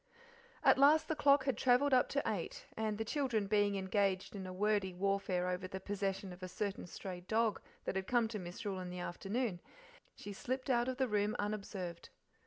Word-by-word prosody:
At - - +6
last 300 +3 +6
the 315 - 0
clock 285 -2 +5
had 270 -3 +1
travelled 260 +4 +4
up 250 - +5
to 280 - 0
eight, 205 -7 -3
and 215 -1 -1
the 220 - -2
children 240 -5 0
being 205 0 +2
engaged 195 0 0
in 190 -2 -5
a - - -5
wordy 200 -1 +1
warfare 190 -1 0
over 180 +1 -2
the 190 +1 -5
possession 195 -1 -3
of 180 - -13
a 185 - -4
certain 200 0 -3
stray 180 +1 -6
dog 220 +4 +1 0.2
that - - -2
had 190 0 -2
come 240 -2 +3
to 215 -2 -4
Misrule 185 +2 -5
in 180 -1 -5
the 180 - -6
afternoon, 195 +3 -2 0.6
she 205 - -7
slipped 255 +5 -2
out 240 0 +2
of 260 -1 -2
the 260 -1 +2
room 210 -1 +1
unobserved. 200 -4 -4
205 Hz, 195 wpm, -35 LUFS, 190-240 Hz, 0.6 s, At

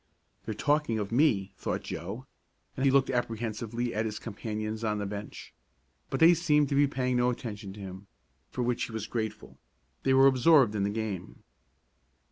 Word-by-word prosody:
"They're 110 - -4
talking 145 -4 +1
of 105 -1 -3
me," 115 -7 +2
thought - - -3
Joe, - - -6 0.5
and 135 - -1
he - - +6
looked 135 -1 +3
apprehensively 115 0 -2
at 110 - 0
his 105 -1 -4
companions 110 0 -5
on 105 -1 0
the 105 - -3
bench, 100 +1 -7 0.6
but - - -2
they 165 +2 +8
seemed 150 -4 +2
to 140 - 0
be 145 +1 +5
paying 125 -2 -1
no 125 0 +3
attention 105 -5 -5
to 105 - -12
him, 95 +1 -9 0.4
for 125 - -3
which 120 0 0
he - - -10
was 110 -2 -4
grateful. 110 -2 -5 0.4
They 135 0 +3
were 135 0 +7
absorbed 135 -2 +5
in 105 - -1
the 100 - +1
game. 105 -4 -5
115 Hz, 180 wpm, -29 LUFS, 105-130 Hz, 0.6 s, they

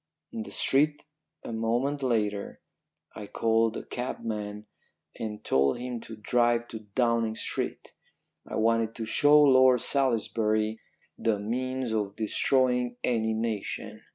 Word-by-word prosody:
"In 230 - -5
the 225 - -7
street 150 +2 +2 0.4
a - - -6
moment 120 +6 -1
later 105 -5 -1 0.5
I 105 - -8
called 115 +1 +1
a - - -6
cabman 105 -4 -5 0.5
and 105 -1 -5
told 70 - +2
him 125 -1 -5
to 115 0 -9
drive 120 +2 +1
to 110 - -6 0.2
Downing 115 -3 +1
Street. - - -4 0.5
I - - -5
wanted 115 0 +1
to 115 - -4
show 145 +6 +5
Lord 130 -3 +6
Salisbury 110 -4 0 0.4
the 110 -2 +1
means 130 +3 -2
of 105 -2 -2
destroying 125 +2 +1
any 110 -2 +1
nation. 110 -2 -3
115 Hz, 125 wpm, -28 LUFS, 110-125 Hz, 0.5 s, Lord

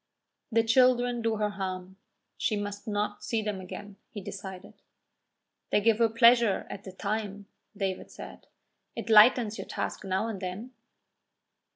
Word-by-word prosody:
"The 230 0 +3
children 245 0 +3
do 225 -1 0
her 210 -1 -1
harm; 190 -1 -5 0.4
she 215 - 0
must 205 +2 -5
not 205 0 -2
see 225 -2 -1
them 205 -3 -3
again," 200 +2 -9
he 205 - -7
decided. 190 -2 -8 1.0
"They - - +3
give 225 +1 +3
her 230 -1 +4
pleasure 230 -2 +5
at 200 - -7
the 190 - -7
time," 205 +1 -4 0.3
David 190 -1 -3
said. - - -11 0.5
"It 230 - -4
lightens 220 0 +6
your - - -6
task - - -4
now 190 +3 -1
and 210 -4 -5
then." 190 +7 -5
210 Hz, 150 wpm, -28 LUFS, 195-225 Hz, 1.0 s, lightens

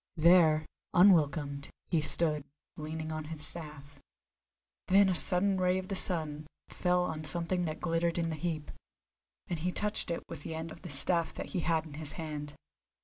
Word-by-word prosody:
There, 160 -2 +5 0.3
unwelcomed, 150 -6 +3 0.2
he 165 -3 +2
stood, 155 -1 +2 0.3
leaning 155 +1 -6
on 155 -1 -5
his 155 -1 +1
staff. 150 -4 -5 0.9
Then 195 +1 +5
a - - +1
sudden 185 +3 +3
ray 180 0 +2
of 185 0 -6
the 195 - -2
sun 155 -5 +4 0.2
fell 180 0 0
on 160 -3 -4
something 175 +3 -1
that 155 -1 -5
glittered 165 0 -1
in 165 -1 -1
the 160 - -3
heap, 155 -1 -4 0.8
and 170 - -4
he 180 +3 -2
touched 210 +3 -2
it 170 - -3
with 165 -3 -9
the 160 - -6
end 160 0 -6
of 165 - -12
the 175 - -9
staff 165 +3 0
that - - -6
he 185 - -3
had 165 -2 0
in 155 - -11
his 150 0 -7
hand. 150 -3 -7
160 Hz, 180 wpm, -30 LUFS, 155-180 Hz, 0.9 s, There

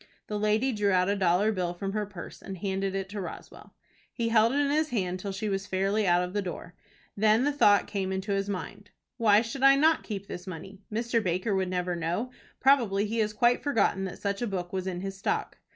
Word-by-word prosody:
The 210 -1 -3
lady 215 +5 +2
drew 210 -3 0
out 185 0 +3
a 200 - +2
dollar 190 +2 +2
bill 180 -4 -2
from 195 +2 -4
her 210 -1 -2
purse, 195 -4 -10
and 190 - -7
handed 195 +1 -2
it 195 -1 -2
to 205 0 -5
Roswell. 180 - -10 0.4
He 230 -1 -2
held 225 0 +4
it 275 - 0
in 285 -1 +2
his 310 +1 +1
hand 185 -5 -2
till 200 +1 -4
she 205 +3 -4
was 195 0 -2
fairly 195 +2 0
out 175 0 +4
of 180 +1 -5
the 205 - 0
door. 180 -2 -7 0.4
Then 215 +3 +3
the 290 - +2
thought 205 -8 +4
came 195 -2 -3
into 190 +2 -3
his 195 0 -1
mind, 205 +1 -6 0.3
"Why 215 -3 +5
should 235 +4 -6
I 275 0 +7
not 315 +3 +4
keep 200 -3 -6
this 180 -1 -8
money? 190 +3 -8
Mr. 230 +1 0
Baker 185 +4 0
would 190 -1 0
never 180 -1 -1
know. 175 +9 -2 0.3
Probably 235 -7 +3
he 225 +2 -2
has 215 -1 +1
quite 240 +3 +2
forgotten 205 -8 +1
that 185 - -6
such 200 +1 -3
a 240 - 0
book 180 -3 -4
was 190 0 -2
in 180 -1 -3
his 195 0 -5
stock." - - -2
200 Hz, 230 wpm, -28 LUFS, 190-220 Hz, 0.4 s, I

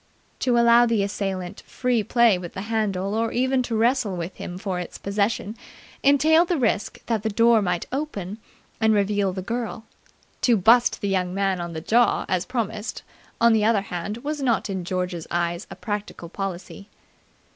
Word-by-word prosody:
To 245 -2 +2
allow 235 0 +6
the 225 -3 +1
assailant 195 -3 -4
free 250 -3 0
play 235 -1 +4
with 175 -1 -8
the 190 - -5
handle 205 -3 -1
or 225 +1 0
even 260 +1 +1
to 240 -2 -3
wrestle 230 -4 +1
with 170 +2 -5
him 180 - -6
for 190 -2 -3
its 175 - -7
possession 200 +1 -1 0.5
entailed 310 +5 +4
the 350 - 0
risk 225 -5 -1
that 225 -3 -1
the 220 - -1
door 230 +1 +4
might 180 -3 -1
open 225 -8 -4 0.4
and 220 -1 +3
reveal 200 -1 +1
the 185 0 -5
girl. 230 +1 -4 0.6
To 240 -3 +4
bust 230 +6 +4
the 200 - -1
young 185 -2 -1
man 195 -2 0
on 170 -1 -5
the 160 - -5
jaw, 235 +8 +2
as 185 -1 -1
promised, 220 -3 -3 0.4
on 235 0 +5
the 220 -1 +2
other 215 -2 +3
hand, 195 +2 -5
was 300 0 -3
not 235 -5 0
in 185 -2 -4
George's 180 -2 -3
eyes 175 +2 -2
a - - -8
practical 205 -5 -5
policy. 195 +1 -6
210 Hz, 180 wpm, -24 LUFS, 185-235 Hz, 0.6 s, allow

